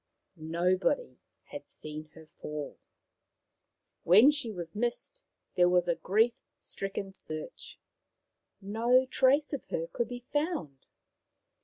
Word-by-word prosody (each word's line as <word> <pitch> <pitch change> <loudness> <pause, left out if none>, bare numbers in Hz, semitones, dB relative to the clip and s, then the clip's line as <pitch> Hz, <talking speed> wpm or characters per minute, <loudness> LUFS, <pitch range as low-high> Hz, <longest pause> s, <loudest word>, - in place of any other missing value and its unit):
Nobody 180 - 0 0.3
had - - -8
seen 155 0 -8
her 160 -1 -13
fall. 150 -1 -7 1.2
When 215 - +7
she 285 -6 -2
was 170 -4 -6
missed 240 - -3 0.3
there 180 0 +4
was 180 -1 +3
a 170 - +3
grief 220 +7 +2 0.2
stricken 195 0 -4
search. 155 -4 -8 0.8
No 235 +6 +3
trace 275 +4 +3
of 280 - -4
her 165 - -2
could 215 +7 -2
be 245 0 -7
found. 290 - -2
195 Hz, 115 wpm, -30 LUFS, 165-245 Hz, 1.2 s, When